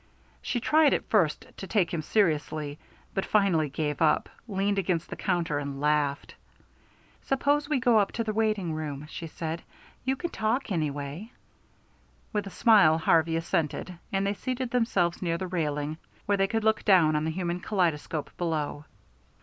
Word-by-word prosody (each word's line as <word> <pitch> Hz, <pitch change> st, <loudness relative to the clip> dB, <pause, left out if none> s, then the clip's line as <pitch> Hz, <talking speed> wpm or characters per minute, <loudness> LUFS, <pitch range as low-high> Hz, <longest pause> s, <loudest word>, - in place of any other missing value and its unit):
She 245 Hz, -, -1 dB
tried 305 Hz, +4 st, +4 dB
at -, -, -4 dB
first 180 Hz, -9 st, +2 dB
to 195 Hz, -, -7 dB
take 185 Hz, -6 st, +1 dB
him 165 Hz, -, -1 dB
seriously, 155 Hz, -5 st, 0 dB, 0.3 s
but 195 Hz, -, 0 dB
finally 185 Hz, -9 st, +2 dB
gave 150 Hz, +1 st, -3 dB
up, 155 Hz, -, +3 dB, 0.2 s
leaned 200 Hz, -1 st, 0 dB
against 175 Hz, -3 st, -1 dB
the -, -, -3 dB
counter 165 Hz, -4 st, 0 dB
and 140 Hz, -1 st, -5 dB
laughed. 145 Hz, -1 st, 0 dB, 0.9 s
"Suppose 285 Hz, +2 st, +1 dB
we 295 Hz, -3 st, +2 dB
go 240 Hz, -3 st, +4 dB
up 200 Hz, -, +1 dB
to 230 Hz, -, -1 dB
the 215 Hz, -1 st, -2 dB
waiting 215 Hz, -6 st, 0 dB
room," 150 Hz, -2 st, -4 dB
she 165 Hz, +1 st, -7 dB
said. 160 Hz, +1 st, -5 dB, 0.4 s
"You 265 Hz, +1 st, +1 dB
can 345 Hz, +5 st, -4 dB
talk, 225 Hz, +3 st, -1 dB
anyway." 150 Hz, -, -3 dB, 1.0 s
With 205 Hz, -1 st, -1 dB
a -, -, -5 dB
smile 195 Hz, -7 st, +5 dB
Harvey 165 Hz, 0 st, +3 dB
assented, 165 Hz, +2 st, -1 dB, 0.2 s
and 195 Hz, 0 st, 0 dB
they 200 Hz, -, +1 dB
seated 255 Hz, +3 st, -3 dB
themselves 195 Hz, -8 st, +1 dB
near 170 Hz, -2 st, 0 dB
the 185 Hz, -, -4 dB
railing, 155 Hz, -3 st, -2 dB, 0.3 s
where 205 Hz, -, +2 dB
they 195 Hz, -, +3 dB
could 225 Hz, +1 st, -1 dB
look 220 Hz, 0 st, +2 dB
down 175 Hz, -6 st, +5 dB
on 150 Hz, -, +1 dB
the 160 Hz, -, -1 dB
human 175 Hz, +1 st, -2 dB
kaleidoscope 165 Hz, -6 st, -1 dB
below. 155 Hz, -3 st, -2 dB
175 Hz, 165 wpm, -28 LUFS, 155-215 Hz, 1.0 s, smile